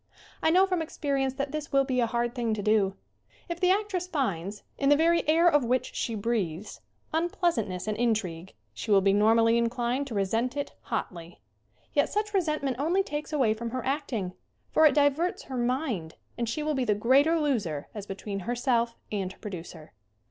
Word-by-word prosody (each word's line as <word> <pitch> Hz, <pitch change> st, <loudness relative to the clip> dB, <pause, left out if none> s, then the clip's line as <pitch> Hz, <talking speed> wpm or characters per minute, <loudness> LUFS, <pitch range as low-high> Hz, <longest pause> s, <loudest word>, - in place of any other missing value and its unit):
I -, -, +3 dB
know 370 Hz, +4 st, +5 dB
from 365 Hz, -3 st, -1 dB
experience 275 Hz, -4 st, -1 dB
that 275 Hz, 0 st, -3 dB
this 305 Hz, -1 st, -5 dB
will 275 Hz, -1 st, +4 dB
be 260 Hz, -2 st, -1 dB
a 235 Hz, -, +2 dB
hard 235 Hz, +1 st, -1 dB
thing 235 Hz, -4 st, -1 dB
to 205 Hz, -, -4 dB
do. 205 Hz, -2 st, +2 dB, 0.5 s
If 340 Hz, 0 st, -4 dB
the 365 Hz, 0 st, +3 dB
actress 380 Hz, -2 st, 0 dB
finds, 205 Hz, -, -2 dB, 0.2 s
in 275 Hz, -, +2 dB
the 290 Hz, -, +7 dB
very 335 Hz, +3 st, +3 dB
air 330 Hz, +2 st, +5 dB
of 295 Hz, -5 st, +4 dB
which 250 Hz, +2 st, 0 dB
she 230 Hz, -, -2 dB
breathes, 205 Hz, -4 st, -2 dB, 0.3 s
unpleasantness 320 Hz, -, 0 dB
and 215 Hz, -, 0 dB
intrigue, 205 Hz, -, -1 dB, 0.2 s
she 110 Hz, -, -7 dB
will 200 Hz, -2 st, +6 dB
be 195 Hz, 0 st, +3 dB
normally 225 Hz, +2 st, +4 dB
inclined 240 Hz, +3 st, -1 dB
to 235 Hz, -, -6 dB
resent 225 Hz, +7 st, 0 dB
it 285 Hz, -, -3 dB
hotly. 170 Hz, -, -5 dB, 0.5 s
Yet 285 Hz, -, +2 dB
such 420 Hz, 0 st, -2 dB
resentment 305 Hz, -8 st, 0 dB
only 345 Hz, +7 st, +2 dB
takes 300 Hz, -2 st, -5 dB
away 260 Hz, -8 st, +2 dB
from 230 Hz, +1 st, -5 dB
her 255 Hz, +1 st, -4 dB
acting, 250 Hz, -9 st, -2 dB, 0.4 s
for 315 Hz, -, +6 dB
it 295 Hz, -, +1 dB
diverts 290 Hz, +4 st, +2 dB
her 265 Hz, -, -7 dB
mind, 240 Hz, -, -1 dB, 0.2 s
and 235 Hz, -2 st, -2 dB
she 300 Hz, +6 st, -2 dB
will 305 Hz, 0 st, 0 dB
be 265 Hz, -2 st, 0 dB
the 215 Hz, -4 st, +2 dB
greater 275 Hz, +10 st, +4 dB
loser 205 Hz, -, -1 dB
as 205 Hz, -2 st, -7 dB
be 195 Hz, -, -4 dB
tween 200 Hz, 0 st, -5 dB
herself 235 Hz, +2 st, 0 dB, 0.2 s
and 195 Hz, -3 st, -2 dB
her -, -, -15 dB
producer. 170 Hz, -5 st, -8 dB
245 Hz, 190 wpm, -28 LUFS, 210-300 Hz, 0.5 s, the